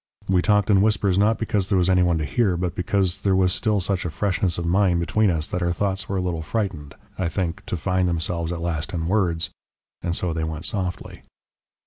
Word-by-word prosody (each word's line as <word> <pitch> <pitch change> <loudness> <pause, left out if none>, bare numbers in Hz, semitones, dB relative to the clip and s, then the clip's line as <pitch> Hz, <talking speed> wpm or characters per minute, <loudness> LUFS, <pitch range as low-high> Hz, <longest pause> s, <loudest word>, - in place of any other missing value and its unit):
We 95 -2 +3
talked 105 +1 +2
in 95 -1 +5
whispers 100 -3 +2
not 110 +2 +3
because 105 -3 -1
there 100 - +3
was 90 -1 +2
any 90 -1 +4
one 85 -2 +2
to 75 - -2
hear, 95 - +1
but 90 -1 -2
because 95 -1 0
there 95 -2 +1
was 90 -1 +3
still 105 -3 +1
such 95 0 -1
a 85 - -2
freshness 95 0 0
of 85 - -3
mind 90 0 +2
between 110 +4 +2
us 80 -3 0
that 90 - -4
our 85 0 +1
thoughts 95 +2 -1
were 100 - -1
a - - 0
little 85 -3 -2
frightened, 85 -6 -3 0.2
I 90 -3 0
think, 90 -2 -3
to 90 - -2
find 90 +2 0
themselves 85 0 -1
at 85 -1 -4
last 85 +1 -3
in 80 -1 -2
words. 85 -3 0 0.5
And 85 0 -2
so 90 -2 -1
they 80 0 -2
went 80 0 -4
softly. 90 -3 -3
90 Hz, 230 wpm, -23 LUFS, 85-100 Hz, 0.5 s, in